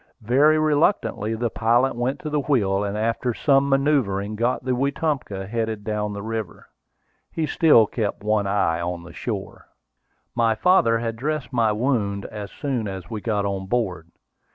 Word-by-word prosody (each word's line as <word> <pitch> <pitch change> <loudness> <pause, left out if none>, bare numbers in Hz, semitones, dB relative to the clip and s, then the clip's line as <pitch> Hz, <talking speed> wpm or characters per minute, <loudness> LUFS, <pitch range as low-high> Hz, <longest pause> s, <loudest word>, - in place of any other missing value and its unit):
Very 140 +7 +4
reluctantly 150 - +1
the 115 0 -2
pilot 120 +4 +2
went 125 +3 -1
to 155 - -4
the 150 - +1
wheel, 105 -9 +1
and 100 +1 -3
after 115 +2 -1
some 140 -1 +3
manoeuvring 130 -8 +1
got 120 +3 -1
the 130 - +1
Wetumpka 135 -6 -1
headed 110 0 -3
down 105 0 -2
the 100 0 -6
river. 110 -4 -5 0.7
He 160 - -1
still 150 -6 +5
kept 105 -2 -3
one 105 -1 +1
eye 100 -4 +1
on 85 0 -4
the 85 0 -12
shore. - - -6 0.7
My 115 -1 +2
father 120 -7 +4
had 115 0 -3
dressed 145 +1 -3
my 115 -3 +3
wound 105 -4 -1
as 105 -2 -7
soon 130 -7 -3
as 95 +2 -7
we 110 -2 -4
got 105 -2 -1
on 95 -1 -3
board. 95 -7 -2
115 Hz, 165 wpm, -23 LUFS, 100-135 Hz, 0.7 s, still